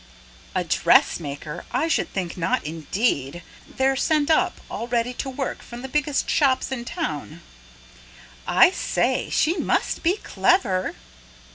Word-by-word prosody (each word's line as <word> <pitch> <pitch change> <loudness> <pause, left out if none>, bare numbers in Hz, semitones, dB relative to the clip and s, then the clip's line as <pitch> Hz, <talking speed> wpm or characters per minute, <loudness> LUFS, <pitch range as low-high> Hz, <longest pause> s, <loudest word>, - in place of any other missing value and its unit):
"A - - +1
dressmaker? 150 +1 +1
I 260 +6 +1
should 325 - 0
think 180 -3 -3
not 165 -3 -1
indeed! 160 - -1 0.2
They're 270 0 +1
sent 305 +2 +2
up, 360 +2 +2
all 235 - -5
ready 240 0 0
to 265 - -4
work, 265 0 -4
from 240 +1 -10
the - - -4
biggest 295 +1 0
shops 270 -3 +2
in 240 -2 -4
town." 145 - -4 1.1
"I - - +6
say! - - 0
she 335 +4 +2
must - - 0
be 355 +5 +2
clever." 190 - +1
250 Hz, 135 wpm, -23 LUFS, -, 1.1 s, I